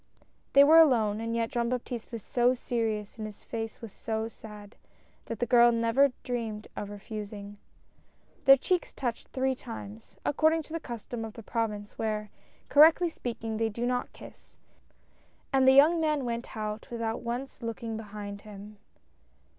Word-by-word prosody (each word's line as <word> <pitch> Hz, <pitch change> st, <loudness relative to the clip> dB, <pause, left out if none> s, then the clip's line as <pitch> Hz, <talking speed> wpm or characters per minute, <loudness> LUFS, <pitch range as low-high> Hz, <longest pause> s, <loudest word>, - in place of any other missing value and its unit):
They 280 Hz, -, +9 dB
were 315 Hz, +3 st, +8 dB
alone, 225 Hz, -9 st, +4 dB
and 230 Hz, 0 st, -2 dB
yet 230 Hz, -1 st, -1 dB
Jean 235 Hz, -1 st, 0 dB
Baptiste 245 Hz, -2 st, -4 dB
was 230 Hz, -4 st, -6 dB
so 245 Hz, +1 st, +2 dB
serious 225 Hz, -4 st, -2 dB
and 215 Hz, -, -3 dB
his 210 Hz, -, -12 dB
face 225 Hz, -1 st, -5 dB
was 225 Hz, -3 st, -8 dB
so 220 Hz, +1 st, -3 dB
sad, 210 Hz, -2 st, -12 dB, 0.5 s
that 230 Hz, -, -5 dB
the 240 Hz, -, 0 dB
girl 240 Hz, -1 st, +6 dB
never 230 Hz, +4 st, +3 dB
dreamed 225 Hz, -4 st, -4 dB
of 205 Hz, -, -5 dB
refusing. 205 Hz, 0 st, -7 dB, 0.9 s
Their 270 Hz, 0 st, +9 dB
cheeks 360 Hz, +6 st, -1 dB
touched 240 Hz, -4 st, -4 dB
three 265 Hz, 0 st, 0 dB
times 110 Hz, -, -9 dB
— -, -, -37 dB
according 315 Hz, +2 st, +2 dB
to 315 Hz, -, -12 dB
the 330 Hz, -, -1 dB
custom 240 Hz, -3 st, -6 dB
of 220 Hz, -1 st, -6 dB
the 230 Hz, -, -10 dB
Province, 210 Hz, -2 st, -3 dB
where, 215 Hz, -1 st, -2 dB, 0.4 s
correctly 320 Hz, +4 st, +6 dB
speaking, 230 Hz, -6 st, -5 dB
they 225 Hz, 0 st, +1 dB
do 235 Hz, +3 st, -3 dB
not 250 Hz, 0 st, -1 dB
kiss -, -, -15 dB, 0.5 s
— -, -, -36 dB
and 265 Hz, -1 st, +4 dB
the 265 Hz, -, +8 dB
young 315 Hz, +5 st, +6 dB
man 300 Hz, -4 st, +1 dB
went 235 Hz, -1 st, -4 dB
out 215 Hz, 0 st, -4 dB
without 230 Hz, -1 st, -3 dB
once 245 Hz, +4 st, -5 dB
looking 230 Hz, -1 st, -4 dB
behind 205 Hz, -2 st, -7 dB
him. 210 Hz, 0 st, -11 dB
230 Hz, 170 wpm, -29 LUFS, 215-255 Hz, 0.9 s, They